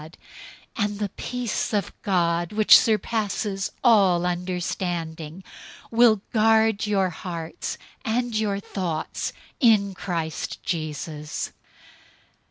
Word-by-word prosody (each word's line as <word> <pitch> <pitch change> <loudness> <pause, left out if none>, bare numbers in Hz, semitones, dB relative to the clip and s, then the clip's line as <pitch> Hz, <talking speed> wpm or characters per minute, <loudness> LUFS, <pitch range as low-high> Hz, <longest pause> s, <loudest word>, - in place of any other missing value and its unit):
004:007 155 - -10 0.7
And 205 0 -2
the 205 -1 -2
peace 245 +2 -3
of 200 -3 -3
God, 175 -2 +1
which 215 0 +8
surpasses 210 -2 -1
all 195 -8 +5
understanding, 175 -2 -3 0.5
will 225 -3 +5
guard 220 -1 +3
your 195 -3 +1
hearts 165 -1 -5 0.3
and 235 +1 -1
your 210 -2 0
thoughts 175 -6 -3 0.3
in 215 - +4
Christ 170 -4 -4
Jesus. 155 -2 -4
195 Hz, 95 wpm, -24 LUFS, 170-215 Hz, 0.7 s, which